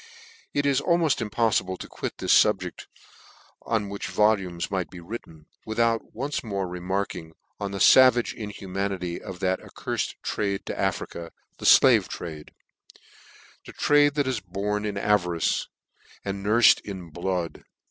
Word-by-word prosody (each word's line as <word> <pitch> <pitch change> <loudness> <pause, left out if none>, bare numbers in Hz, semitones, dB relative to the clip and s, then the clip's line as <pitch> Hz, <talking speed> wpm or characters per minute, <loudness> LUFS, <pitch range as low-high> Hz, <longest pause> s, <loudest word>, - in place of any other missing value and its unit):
It 145 0 +1
is 140 -1 +2
almoft 170 -6 +2
impoffible 105 -4 0
to - - -8
quit - - -6
this - - +2
fubject, - - +2 0.7
on 110 -3 -1
which 100 0 -5
a - - -8
volume 100 -5 +2
might 95 -2 -2
be 90 - -10
written, 85 -5 -9 0.2
without 115 +1 0
once 140 +5 -3
more 100 -4 -3
remarking 90 -2 -4 0.3
on 100 - -3
the 100 - -5
favage 125 +2 +6
inhumanity 95 -4 -4
of 95 -3 -8
that 95 0 +1
accurfed - - -4
traffic 100 -2 -2
to - - -4
Afrcia, 85 -1 -3 0.3
the - - +7
(lave - - +5
trade; 80 -3 -7 1.2
a - - -8
trade 145 0 +3
that 145 -1 +1
is 130 -3 -1
born 105 +2 -3
to 100 - -4
avarice, 90 -5 +1 0.6
and 100 0 -4
nurfed 115 +4 +5
in 95 -5 -8
blood 85 0 -3
100 Hz, 145 wpm, -25 LUFS, 90-115 Hz, 1.2 s, the